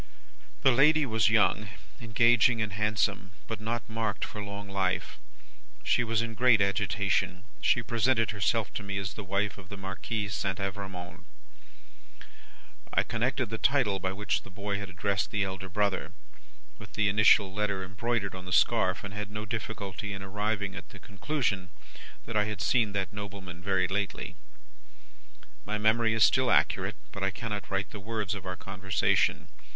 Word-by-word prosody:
"The 135 - +7
lady 150 +4 +5
was 110 -3 +2
young, 105 -1 +3 0.3
engaging, 115 +1 +4
and 105 -2 -1
handsome, 105 -2 0
but 110 -2 -5
not 115 +2 -3
marked 110 -2 -2
for 105 - -6
long 100 0 -6
life. 95 -2 -1 0.6
She 120 - +3
was 115 -1 +1
in 115 -1 -4
great 120 0 +5
agitation. 95 -2 +1 0.2
She 120 - +3
presented 115 0 +2
herself 105 +1 0
to - - -3
me 100 -1 -4
as 95 -1 -3
the 105 - -7
wife 100 +1 -1
of 95 -1 -13
the 100 - -7
Marquis 95 +3 -3
St. 95 -2 -2
Evrémonde. 95 -4 -5 1.7
I - - +3
connected 125 0 -1
the 110 - -3
title 115 -9 +2
by 95 +1 -1
which 100 +1 -1
the - - -13
boy 100 +1 -3
had 100 -2 -6
addressed 100 +1 -1
the 105 -2 0
elder 95 0 -4
brother, 100 0 0 0.7
with - - -12
the 110 -1 +2
initial 100 -1 +5
letter 100 -2 -1
embroidered 100 +2 -2
on 95 -1 -8
the 90 - -7
scarf, 90 0 +3
and 100 -1 -6
had 105 0 -4
no 105 +1 -5
difficulty 105 -2 -4
in 95 0 -6
arriving 105 0 -2
at - - -8
the - - -12
conclusion 100 -2 -2 0.6
that 115 - -6
I 105 -1 +3
had 105 -2 -4
seen 115 -3 +2
that 100 -1 -2
nobleman 100 -4 -7
very 95 -1 +1
lately. 100 +1 -3 1.3
"My 105 +1 -2
memory 110 +1 +3
is 110 - +5
still 130 +3 +4
accurate, - - +2 0.2
but 100 - -7
I 95 - +2
cannot 105 0 -5
write 95 0 -1
the 105 - -7
words 105 -1 -3
of 95 -2 -6
our 95 - -3
conversation. 95 -1 +1
100 Hz, 165 wpm, -29 LUFS, 95-110 Hz, 1.7 s, The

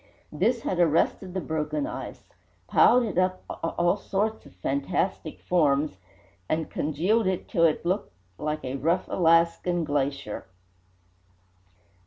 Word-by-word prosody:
This 225 +9 +1
had 180 - -1
arrested 175 +3 +2
the 190 - -1
broken 160 - -2
ice, 320 - -8 0.3
piled 250 0 +5
it 205 -6 -1
up 185 0 0
in - - -5
all 175 +4 +1
sorts 210 +2 -2
of - - -18
fantastic 140 - -2
forms, 150 - +1 0.5
and 160 0 -1
congealed 180 +9 +1
it 185 -1 -1
till 170 - +3
it 160 +1 +1
looked 185 +4 -1 0.3
like 150 -2 -3
a 130 +1 -3
rough 170 +6 0
Alaskan 170 0 +3
glacier. 140 -5 -2
170 Hz, 130 wpm, -26 LUFS, 150-190 Hz, 0.5 s, piled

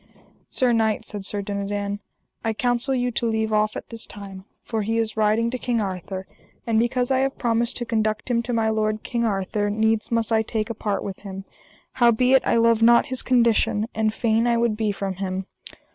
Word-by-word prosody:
Sir 250 -2 +1
knight, 220 -2 +1
said 205 -2 -7
Sir 205 -1 -3
Dinadan, 200 0 -3 0.4
I 225 - 0
counsel 245 +3 0
you 245 -1 0
to 230 0 -1
leave 220 -1 0
off 215 0 +2
at - - -7
this 230 -1 -8
time, 195 -2 -9 0.2
for 225 -2 -2
he 225 +2 -1
is 225 -1 -1
riding 220 +2 +2
to 255 - -3
King 240 -2 0
Arthur; 190 -1 -4 0.4
and 225 -2 +2
because 245 +2 0
I 260 - +3
have 270 0 0
promised 235 0 0
to 240 - -3
conduct 220 -2 -1
him 235 -1 +2
to 245 - -5
my 225 -2 +1
lord 215 0 0
King 235 -1 -1
Arthur 205 0 -1
needs 220 +1 +1
must 230 -1 0
I 220 -1 +4
take 220 0 -2
a - - -2
part 205 -2 -2
with 195 -2 -6
him; 195 -1 -8 0.5
howbeit 250 +2 +4
I 235 - +3
love 230 -1 +4
not 235 +3 +5
his 260 -1 -1
condition, 230 -4 +2
and 220 0 +1
fain 225 +1 +1
I 235 -1 +3
would 230 -2 +1
be 215 -1 0
from 195 -2 -4
him. 190 -1 -3
220 Hz, 205 wpm, -23 LUFS, 210-235 Hz, 0.5 s, not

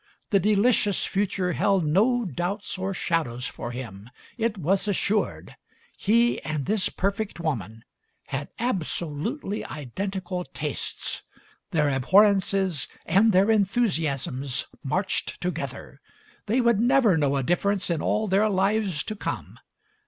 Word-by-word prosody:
The 200 - +5
delicious 210 0 +3
future 195 -2 0
held 195 -3 +2
no 225 +10 +3
doubts 185 +3 -3
or 190 +1 -2
shadows 155 -10 -1
for 120 - -5
him. 115 -4 -8 0.3
It 230 -2 -1
was 190 +4 +1
assured. 205 +1 -1 0.4
He 235 +4 +2
and 155 -3 -3
this 210 -2 +1
perfect 200 0 -2
woman 115 - -3 0.4
had 140 +1 -4
absolutely 200 - -2
identical 180 - -4
tastes; - - -3 0.5
their 150 -5 +2
abhorrences 190 - +3 0.2
and 200 +7 +4
their 195 +3 +4
enthusiasms 160 - 0 0.2
marched 185 +8 -1
together; 140 -5 -5 0.5
they 235 +5 +2
would 235 -3 +3
never 240 -4 +4
know 145 -3 +1
a 135 - 0
difference 185 +5 +1
in 165 - 0
all 215 0 0
their 200 +3 +3
lives 195 -4 +1
to 215 - -5
come. - - -5
190 Hz, 125 wpm, -26 LUFS, 150-210 Hz, 0.5 s, The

